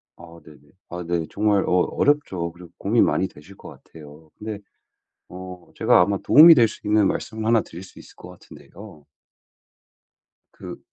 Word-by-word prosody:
아 85 0 -15
네네. 75 -3 -17 0.3
아 90 0 -7
네. 85 -2 -2
정말 105 -1 0
어 - - -2
어렵죠. 90 - -1
그리고 85 -1 -15
고민이 110 +4 +1
많이 95 - -1
되실 85 +6 -17
것 - - -13
같아요. 75 0 -16
근데 105 -1 -7 0.7
어 90 -1 -12
제가 - - +3
아마 100 +2 0
도움이 165 +3 +8
될 120 -4 +4
수 105 - -13
있는 105 -1 +2
말씀을 110 0 -5
1 115 -1 +2
드릴 85 -1 -12
수 95 - -17
있을 - - -17
것 - - -14
같은데요. 95 -7 -16 1.5
그 - - -11
95 Hz, 290 characters per minute, -21 LUFS, 85-110 Hz, 1.5 s, 도움이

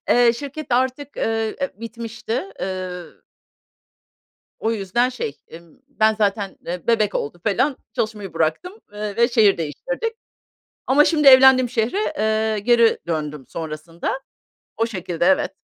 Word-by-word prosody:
Eee, 240 -1 +5
şirket 285 +5 -7
artık, 260 +3 0
eee, 225 -1 -1 0.2
bitmişti. 230 +2 -5 0.2
Eee 185 -1 -4 1.6
O 225 - 0
yüzden 225 +4 0
şey, 245 - -5 0.2
ımm, 170 +4 -15
ben 220 -6 +2
zaten, 205 -2 -1
eee, 175 0 -5
bebek 215 -4 +2
oldu 170 +5 -3
falan 260 +7 +1 0.2
çalışmayı 210 -4 -3
bıraktım, 165 - -1
ııı, 210 -1 -5
ve 235 0 +4
şehir 220 -5 +4
değiştirdik. 455 - -3 0.7
Ama 285 +3 +5
şimdi 300 -3 +4
evlendiğim 260 -1 +8
şehre, 245 - -1
eee, 220 0 +1
geri 235 +2 +4
döndüm 150 -4 -3
sonrasında. 165 - -5 0.6
O 225 - +1
şekilde, 180 -6 -3
evet. 190 +1 +3
220 Hz, 125 wpm, -21 LUFS, 185-250 Hz, 1.6 s, evlendiğim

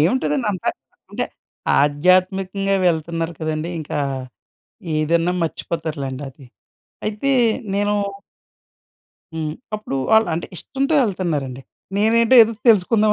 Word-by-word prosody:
ఏముంటదండి 255 - +1
అంతా! 185 - -3 0.4
అంటే - - -2 0.6
ఆధ్యాత్మికంగా 185 +6 +2
వెళ్తున్నారు 165 0 0
కదండీ! 155 +2 -2
ఇంకా 150 0 -4 1.0
ఏదన్నా 165 +3 +2
మర్చిపోతారులెండి 155 -5 -4
అది. 135 0 -16 0.6
అయితే 215 +6 -1 0.4
నేను 205 +1 +1 1.4
హ్మ్. 155 -1 -3 0.2
అప్పుడు 210 -10 -4 0.2
ఆళ్ళు, 220 -4 +5
అంటే 170 - -3
ఇష్టంతో 275 - -1
వెళ్తున్నారండి. 150 - -2 0.3
నేనేంటో 230 +4 +4
ఏదో 225 +1 +1 0.2
తెలుసుకుందాం 215 +1 +4
180 Hz, 95 wpm, -21 LUFS, 155-210 Hz, 1.4 s, ఆళ్ళు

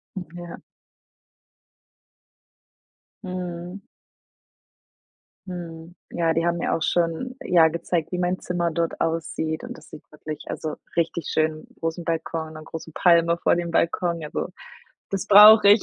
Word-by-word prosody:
Hm, 190 - -4
ja. 175 -1 -9 2.6
Mhm. 180 0 -6 1.7
Mhm, 170 -1 -8 0.2
ja, 165 -1 +1
die 165 +1 0
haben 170 0 +1
mir 170 - -1
auch - - -1
schon, 175 +9 0
ja, 170 -3 +5
gezeigt, 170 +1 -2
wie 180 - -2
mein 180 +1 0
Zimmer 175 -1 -1
dort 165 +1 -2
aussieht, 160 -1 -2
und - - -7
das 155 - -15
sieht 155 - -11
wirklich, 150 0 -7
also 155 -1 -4 0.2
richtig 170 -1 -1
schön 155 0 0
'n - - -26
großen 165 +1 -3
Balkon, 160 -1 -3
'ne 155 0 -9
große 160 0 -8
Palme 170 -1 +4
vor - - +2
dem 175 -1 -3
Balkon, 170 0 0
ja, 150 - -6
so - - -3 0.6
das 195 0 -2
brauche 210 +1 +9
ich. 205 +1 +7
170 Hz, 145 wpm, -24 LUFS, 160-180 Hz, 2.6 s, brauche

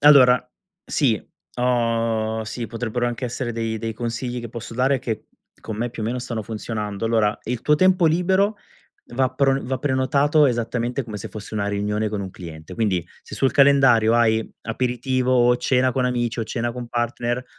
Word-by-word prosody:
allora, 125 -4 +6 0.4
sì, 120 -9 +1 0.4
ho 115 -2 0
sì, 115 +2 -5
potrebbero 120 +1 -2
anche 120 +1 -3
essere 120 0 -3
dei 115 -1 -2
dei 115 +1 -3
consigli 120 +2 -4
che 120 - -7
posso 115 0 -8
dare 130 +1 +2
che 115 -4 -4 0.4
con 110 - -6
me 120 +2 -2
più 115 - -6
o - - -1
meno 125 +2 -2
stanno 115 -2 -4
funzionando. 105 -1 -4
Allora, 110 -2 +2
il 120 0 -3
tuo 150 - +4
tempo 185 +1 +4
libero 190 +5 +2 0.5
va 130 +2 0
pron 135 +1 +1
va 130 0 -1
prenotato 140 +2 +3
esattamente 120 +1 -1
come 110 -3 -7
se 100 - -6
fosse 105 0 -9
una 100 -1 -1
riunione 105 +1 -1
con 105 -1 -3
un 95 -1 -5
cliente. 80 -4 -10
Quindi 100 -7 0 0.2
se - - -9
sul 135 - +2
calendario 135 -5 +5
hai 110 -1 +2
aperitivo 125 +2 -1
o 125 -1 +4
cena 130 +1 +2
con 130 +1 0
amici 120 -2 -1
o 115 - 0
cena 120 +1 -2
con 120 0 -6
partner, 120 +1 -2
120 Hz, 180 wpm, -22 LUFS, 110-130 Hz, 0.5 s, allora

